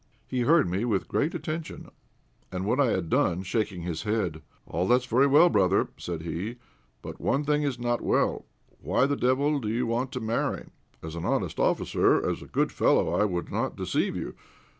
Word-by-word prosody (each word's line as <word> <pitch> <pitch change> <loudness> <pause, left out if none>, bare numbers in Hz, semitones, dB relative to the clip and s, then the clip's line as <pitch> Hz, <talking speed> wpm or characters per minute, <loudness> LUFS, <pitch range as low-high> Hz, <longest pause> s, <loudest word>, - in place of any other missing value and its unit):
He 130 - -2
heard 150 - +4
me 95 +5 -1
with 110 -6 0
great 155 +4 0
attention, 160 0 -5 0.6
and 95 0 -3
when 120 +6 +1
I 140 - +4
had 95 -7 0
done, 90 +3 +1
shaking 95 -3 -2
his 85 -2 -3
head 100 -7 -1 0.2
"All 90 +4 -2
that's 125 +2 +3
very 125 +3 +3
well, 150 +5 +6
brother," 100 - +2
said 85 -2 -5
he, 85 +8 -4 0.5
"but - - -8
one 140 +2 +1
thing 150 0 +1
is 140 -4 -1
not 120 0 -1
well. - - +1 0.4
Why - - +2
the 145 +1 0
devil 140 +3 +1
do 110 - -5
you 120 +3 0
want 120 +3 -1
to 125 - -2
marry? 110 0 -1 0.4
As 80 0 -6
an 85 - -5
honest - - -1
officer, - - +2
as - - -2
a - - -10
good - - 0
fellow, - - +2
I 105 - +3
would 90 -4 -3
not - - -1
deceive - - -1
you. - - -4
115 Hz, 195 wpm, -27 LUFS, 95-135 Hz, 0.6 s, well